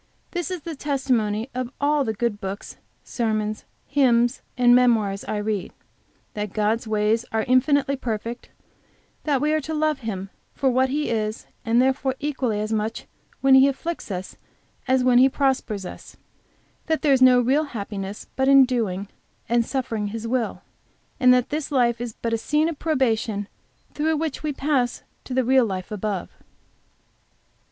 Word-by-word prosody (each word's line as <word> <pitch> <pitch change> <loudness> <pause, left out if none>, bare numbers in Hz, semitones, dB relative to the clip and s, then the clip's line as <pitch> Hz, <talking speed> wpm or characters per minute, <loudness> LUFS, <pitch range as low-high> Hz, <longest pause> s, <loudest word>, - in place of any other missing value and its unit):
This 350 0 -3
is 365 -3 -4
the 325 +1 -6
testimony 255 -6 -1
of 250 0 -3
all 290 0 +2
the 220 -4 -2
good 220 -2 -2
books, 195 +1 -6 0.3
sermons, 215 -2 -2 0.2
hymns, 245 -3 +2 0.2
and, 245 -1 +5
memoirs 225 -5 +3
I 215 - -2
read 210 -2 -2 0.6
that 210 -2 -4
God's 220 +2 0
ways 215 +1 +1
are 220 0 0
infinitely 275 +3 +2
perfect; 230 -1 -4 0.8
that 290 -4 +2
we 300 +1 +2
are 310 - +1
to 315 +3 -4
love 305 -2 +1
Him 195 -5 -5 0.2
for 265 -2 +2
what 260 +1 +2
He 295 +1 -1
is, 215 -1 -2 0.2
and 230 +1 +2
therefore 265 +1 +1
equally 265 -7 -1
as 215 +1 -2
much 220 +1 -2 0.4
when 270 0 +5
He 265 +1 +8
afflicts 320 +3 -4
as 205 +6 -4
when 250 -1 +5
He 265 +1 +6
prospers 260 -8 -1
us; - - -10 0.7
that 320 -1 0
there 290 -2 +5
is 260 - +2
no 255 -1 +7
real 270 +6 +2
happiness 205 -5 -6
but 265 0 +1
in 275 -1 +8
doing 210 -6 -2 0.4
and 235 0 +2
suffering 230 -5 -2
His 225 +2 -5
will, 240 -1 -2 0.6
and 250 -1 +6
that 250 0 +3
this 300 0 -3
life 240 -3 +2
is 240 -2 -4
but 230 -1 0
a 230 - +1
scene 300 +7 +1
of 320 - -6
probation 225 -9 0 0.5
through 315 +1 0
which 315 -2 -3
we 305 - -1
pass 270 -3 0 0.2
to 255 - -5
the 260 - +3
real 260 +1 +4
life 185 -1 -5
above. 205 -3 -3
245 Hz, 165 wpm, -23 LUFS, 215-275 Hz, 0.8 s, He